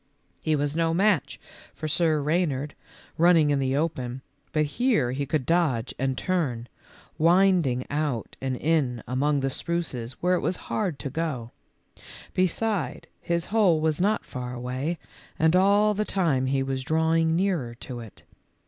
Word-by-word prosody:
He 155 - 0
w 145 - +1
r - - +2
as 145 +1 -2
no 165 0 +1
match 195 -4 +1 0.4
for 155 - -4
Sir 155 -1 +2
Rey 165 +5 +2
nard, 145 +1 -4 0.5
running 165 -3 +5
in 140 - +2
the 135 0 0
open, 130 -5 -2 0.3
but 155 -1 +2
here 185 - +1
he 140 +2 -3
could 145 -2 -1
dodge 135 -7 +1
and 135 0 0
turn, 135 -11 -1 0.5
winding 170 -6 +3
out 145 -6 -2
and 130 -1 -2
in 135 -7 0
among 140 +3 +1
the 135 0 -1
spruces 130 -8 -3
where 180 +6 0
it 180 - +2
was 185 - -1 0.2
hard 185 -9 -1
to 140 - -5
go; 135 -7 -3 0.8
beside, 185 - -1
his 170 -1 -1
hole 195 -8 +4
was 155 +1 0
not 210 +3 +1
far 125 -2 -6
away, 130 +7 -3 0.4
and 160 +2 +3
all 200 +3 +4
the 210 +1 0
time 160 -11 +1
he 135 0 +1
was 135 -1 -3
drawing 160 +2 +2
nearer 170 -11 0
to 125 0 -8
it. 115 -3 -12
155 Hz, 165 wpm, -26 LUFS, 130-170 Hz, 0.8 s, running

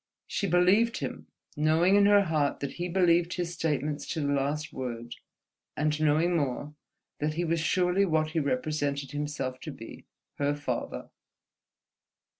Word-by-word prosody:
She 200 - -2
believed 190 +7 +3
him, - - -5 0.3
knowing 160 +5 +3
in 200 0 +6
her 205 0 +6
heart 155 -5 0
that 140 -1 -3
he 175 +1 -4
believed 175 -1 +3
his 175 -1 -3
statements 150 -2 -2
to 165 - -3
the 145 0 0
last 145 +3 -1
word; 120 -2 -5 0.6
and 150 0 0
knowing 155 +3 +3
more, 145 -1 -2 0.5
that 150 +1 -1
he 175 +1 -1
was 165 0 0
surely 180 +3 +2
what 155 -2 +1
he 160 - 0
represented 140 0 -1
himself 145 -3 -3
to 155 - -7
be, 115 -4 -11 0.3
her 145 0 +1
father. 145 - -4
155 Hz, 150 wpm, -28 LUFS, 145-175 Hz, 0.6 s, in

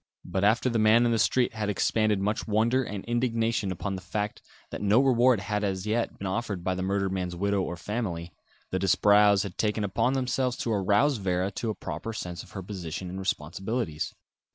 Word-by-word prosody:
But 95 - -2
after 110 +5 +3
the 115 -2 +1
man 110 +2 +5
in 120 - +2
the 115 - +1
street 125 +3 +2
had 105 -2 -2
expended 105 0 +1
much 105 +4 -1
wonder 115 +5 +2
and 105 -5 -6
indignation 115 -4 0
upon 95 +2 -3
the 95 - -5
fact 105 +3 -3 0.3
that - - -5
no 105 +3 +4
reward 125 -4 +4
had 105 0 -2
as 95 -1 -2
yet 115 +2 -1
been 100 - -6
offered 95 -2 -2
by 95 - 0
the 90 - -3
murdered 100 0 0
man's 90 -2 -3
widow 100 +2 0
or 90 -1 -3
family, 90 -5 -4 0.4
the 95 - 0
Disbrowes 100 +1 +5
had 100 -4 -8
taken 105 0 0
upon 115 +6 +1
themselves 130 -1 0
to 115 - -1
arouse 105 +8 +3
Vera 95 -1 -1
to 110 +3 -3
a 110 - -2
proper 115 - -5
sense 90 -5 -5
of - - -15
her 95 - -5
position 90 -2 -6
and 95 - -5
responsibilities. 95 0 -3
105 Hz, 200 wpm, -27 LUFS, 95-115 Hz, 0.4 s, man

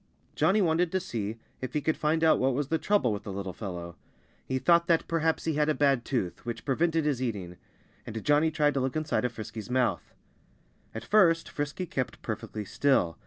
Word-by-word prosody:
Johnnie 190 +7 +3
wanted 165 0 +2
to 190 - +2
see 115 - -4 0.2
if 130 -1 -5
he 150 - +1
could 160 +2 +1
find 160 +1 0
out 160 - +5
what 130 0 +2
was 145 0 -2
the 160 - +1
trouble 200 - +2
with 100 - -4
the 100 - -7
little 95 -1 -5
fellow. 85 -4 -6 0.5
He 130 - -2
thought 170 +6 +4
that 165 -1 +2
perhaps 160 -1 0
he 160 - 0
had 150 +1 +1
a 155 - +2
bad 140 -4 +2
tooth, 115 -10 -2
which 120 -1 -5
prevented 160 +3 +1
his 140 -4 0
eating. 95 -8 -4 0.5
And 110 0 -5
Johnnie 150 +2 +4
tried 150 -2 +2
to 135 - 0
look 130 0 -1
inside 155 -4 0
of 125 - 0
Frisky's 110 0 -7
mouth. 125 -1 0 0.8
At 110 +1 -6
first 165 - +4
Frisky 145 +5 -3
kept 130 -6 -4
perfectly 110 -1 -5
still. 100 - +1
140 Hz, 205 wpm, -28 LUFS, 115-160 Hz, 0.8 s, out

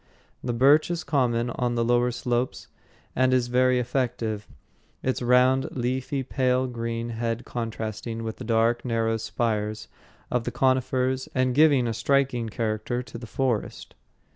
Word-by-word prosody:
The 125 - -1
birch 140 +7 +4
is 175 0 -2
common 120 -5 +1
on 120 0 -1
the 115 0 +1
lower 120 +1 +3
slopes 125 +1 -2 0.5
and 130 0 +3
is 125 -1 +2
very 130 +1 +3
effective, 120 -4 -2 0.6
its 130 0 -1
round, 125 +2 +4
leafy, 130 +2 -1
pale 130 -1 +1
green 115 -1 -3
head 115 0 -3
contrasting 115 -1 -4
with 110 -1 -5
the - - -7
dark, 115 +1 +2
narrow 115 -2 0
spires 110 -1 -2 0.4
of 125 -1 +1
the - - -3
conifers 130 0 +1
and 130 -1 +2
giving 145 -3 +5
a 115 - -1
striking 130 -2 +1
character 110 +2 -2
to 125 -1 -9
the 120 - -9
forest. 125 -2 -2
120 Hz, 145 wpm, -26 LUFS, 115-130 Hz, 0.6 s, giving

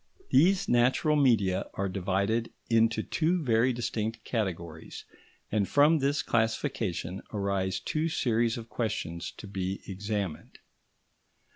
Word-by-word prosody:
These 180 +7 +4
natural 125 +5 +3
media 115 -10 +2
are 100 - -1
divided 100 +4 -1 0.2
into 115 -1 +3
two 170 +1 0
very 120 0 +3
distinct 115 -2 -3
categories, 85 -8 -4 0.5
and 100 -3 +1
from 150 +5 +5
this 140 +1 +1
classification 110 - -1
arise 100 -2 -1
two 160 +1 -1
series 120 -4 +1
of 115 -1 -7
questions 110 -8 -3
to - - -9
be 95 -1 -4
examined. 100 -3 -4
110 Hz, 115 wpm, -29 LUFS, 95-125 Hz, 0.5 s, from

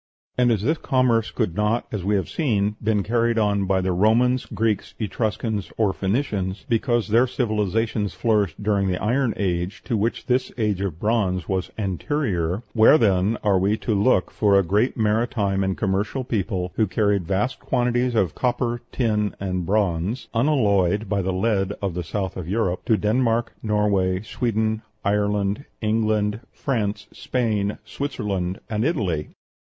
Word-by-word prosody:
And 125 -1 +3
as 105 -3 0
this 155 +6 +1
commerce 125 -4 +2
could 110 -8 -1
not, 105 +3 +1
as 105 -4 -3
we 105 +2 +1
have 95 - 0
seen, 105 -10 +1
have 105 - -13
been 105 -2 +1
carried 115 +2 +1
on 100 -2 +2
by 95 0 +1
the 95 0 0
Romans, 115 +7 +2
Greeks, 110 -3 -1
Etruscans, 110 -1 -2
or 105 -4 +2
Phoenicians, 100 -2 -2
because 120 -1 +1
their 120 +4 +4
civilizations 110 -3 -1
flourished 105 -6 0
during 100 -2 +1
the 90 -1 0
Iron 120 +3 +1
Age, 90 -1 -2
to 115 - -1
which 110 +3 -1
this 130 0 0
age 105 -4 0
of 90 -5 -3
bronze 100 -5 0
was 95 -1 -1
anterior, 95 - -1
where 115 +6 +7
then 100 -2 +2
are 100 -3 +3
we 100 +4 +1
to 110 - -2
look 100 -1 +2
for 100 -2 +3
a 100 - +4
great 105 +9 +1
maritime 105 -3 +1
and 95 -1 -1
commercial 100 +6 -1
people, 95 -6 -2
who 110 - +3
carried 100 -3 +1
vast 105 +8 -1
quantities 125 -1 0
of 95 -8 +2
copper, 120 -1 -1
tin, 105 -4 0
and 90 -3 -2
bronze 100 +2 0
(unalloyed 105 - +2
by 100 -1 +1
the 95 +1 -1
lead 95 0 0
of 100 -3 -2
the 90 +1 -3
south 95 +2 -3
of 90 -2 -5
Europe) 95 -3 0
to 110 - +3
Denmark, 115 +2 +1
Norway, 100 -4 +1
Sweden, 110 -1 -1 0.2
Ireland, 105 +3 0
England, 110 -1 +1
France, 110 -6 -2
Spain, 110 -5 -1
Switzerland, 100 -10 -3
and 110 0 -1
Italy? 100 - -1
105 Hz, 160 wpm, -23 LUFS, 95-115 Hz, 0.2 s, where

